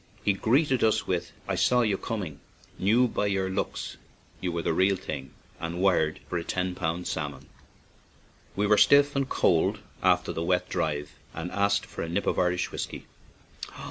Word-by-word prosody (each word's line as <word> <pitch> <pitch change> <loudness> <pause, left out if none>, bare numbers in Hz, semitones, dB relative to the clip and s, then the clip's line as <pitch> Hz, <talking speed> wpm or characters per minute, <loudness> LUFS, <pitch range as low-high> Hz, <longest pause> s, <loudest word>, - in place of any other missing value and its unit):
He 100 - +4
greeted 130 +6 +2
us 110 -1 +3
with: 90 -2 -2 0.2
"J - - 0
saw 125 0 +3
you 105 -4 +2
coming; 95 - -4 0.4
knew 115 +6 +4
by 105 -3 -1
your 95 -1 0
looks 95 - -3 0.4
you 90 - -2
were 85 -1 -2
the - - +1
real 95 +4 +3
thing, 70 -7 -6 0.3
and 85 +1 -4
wired 90 -5 +2
for 90 - -2
a - - -5
ten 90 +1 -2
pound 85 0 -2
salmon/' 70 -3 -4 1.1
We 105 - +1
were 105 0 +4
stiff 145 0 +6
and 135 -1 0
cold 85 -3 +2 0.2
after - - +2
the 80 - -3
wet 90 +1 +1
drive, 75 -1 -2 0.2
and 80 +2 -4
asked 100 0 +1
for - - -7
a 85 - -3
nip 95 +4 -1
of - - +1
Irish 90 -1 +1
whiskey. - - -5
95 Hz, 175 wpm, -27 LUFS, 85-105 Hz, 1.1 s, stiff